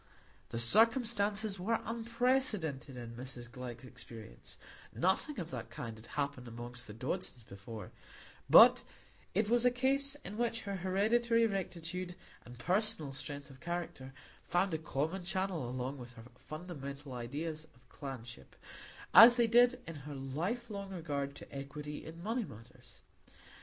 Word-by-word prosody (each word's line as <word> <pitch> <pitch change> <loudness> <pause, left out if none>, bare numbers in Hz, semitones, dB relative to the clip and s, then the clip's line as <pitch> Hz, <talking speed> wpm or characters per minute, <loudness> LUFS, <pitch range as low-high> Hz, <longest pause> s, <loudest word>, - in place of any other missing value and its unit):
The 115 - -4
circumstances 215 - +4
were 225 +5 +1
unprecedented 230 - 0
in 120 -1 -7
Mrs 120 -1 -7
Glegg's 125 0 -7
experience; 115 - -10 0.4
nothing 190 - +1
of 170 -2 -5
that 125 -3 -5
kind 115 -2 -6
had 110 +1 -13
happened 140 -3 -2
among 120 +1 -7 0.2
the 105 - -8
Dodsons 130 0 -3
before; 105 +2 -9 0.6
but - - +9 0.5
it 210 +2 +3
was 240 +2 +3
a 250 - +7
case 270 +3 +3
in 210 +3 -6
which 230 -1 0
her 200 -2 -3
hereditary 230 +6 +3
rectitude 180 -3 -3 0.3
and 120 0 -12
personal 170 - 0
strength 140 0 -6
of 130 - -14
character 170 -6 -4 0.4
found 175 +1 +2
a 160 - 0
common 160 +4 -2
channel 185 -7 -1
along 130 +2 -3
with 125 0 -9
her 115 - -12
fundamental 140 -2 -7
ideas 150 +6 -4
of 120 0 -25
clanship, 120 - -8 0.6
as 235 +2 +11
they 240 -1 +4
did 245 +2 +5
in 165 - -7
her 145 - -5
lifelong 195 - -3
regard 145 -6 -3
to - - -11
equity 150 +2 -6
in 165 +2 -9
money 230 +4 0
matters. 120 - -14
160 Hz, 140 wpm, -34 LUFS, 130-210 Hz, 0.6 s, as